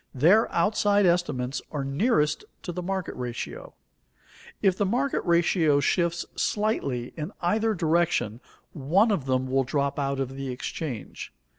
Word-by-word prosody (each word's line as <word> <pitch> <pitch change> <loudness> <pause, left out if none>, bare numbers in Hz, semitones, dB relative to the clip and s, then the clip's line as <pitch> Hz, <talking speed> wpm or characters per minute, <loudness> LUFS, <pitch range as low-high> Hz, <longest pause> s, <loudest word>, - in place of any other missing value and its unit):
Their 180 - +4
outside 205 +2 +2
estimates 145 -7 0
are 145 -3 -2
nearest 150 - +1 0.2
to 175 - -4
the 180 - -4
market 190 0 -3
ratio. 120 -2 -6 0.8
If 195 -3 +3
the 205 - 0
market 260 +7 0
ratio 170 -3 +3
shifts 170 +3 +1
slightly 140 - -1
in 155 +3 -5
either 215 +5 +1
direction, 160 - +1 0.3
one 175 - +2
of 160 -10 -1
them 130 -1 +1
will 135 +1 +1
drop 140 +2 -1
out 140 -1 -1
of 135 0 -3
the 135 -1 -5
exchange. 125 0 -5
160 Hz, 140 wpm, -26 LUFS, 135-190 Hz, 0.8 s, Their